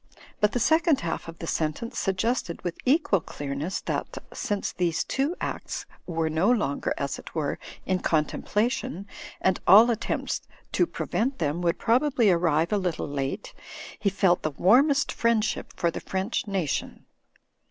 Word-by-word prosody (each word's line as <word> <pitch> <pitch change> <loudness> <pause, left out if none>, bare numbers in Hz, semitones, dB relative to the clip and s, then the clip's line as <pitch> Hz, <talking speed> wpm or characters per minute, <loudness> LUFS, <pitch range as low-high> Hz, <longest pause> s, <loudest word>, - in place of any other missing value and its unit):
But 210 0 +3
the 245 - +1
second 320 +3 +3
half 165 -1 -3
of 165 0 -8
the - - -6
sentence 165 - -2
sug 195 - 0
gested 220 -5 -1
with 175 -2 -3
equal 270 - +3
clearness 145 +4 -4
that, - - -3 0.2
since 205 -1 -2
these 170 -2 0
two 280 +6 -1
acts - - -4 0.2
were 165 -2 0
no 160 +7 +2
longer, 210 - +1
as 140 -1 -3
it - - -12
were, 150 -3 -1 0.3
in 185 -1 +1
contemplation, 205 - 0 0.4
and 190 -1 +2
all 220 +6 +9
attempts 230 -1 -2 0.3
to - - +2
prevent 260 +4 -2
them 155 +1 -1
would 170 -1 +1
probably 245 -2 +3
arrive 170 0 +2
a 205 - +3
little 180 -4 -2
late, 140 -2 -3 0.5
he 205 - +2
felt 190 -2 +2
the 155 - 0
warmest 265 - +4
friendship 230 -2 0
for 170 - +1
the - - -6
French 190 +4 -2
nation. 190 -7 -2
190 Hz, 155 wpm, -26 LUFS, 165-235 Hz, 0.5 s, all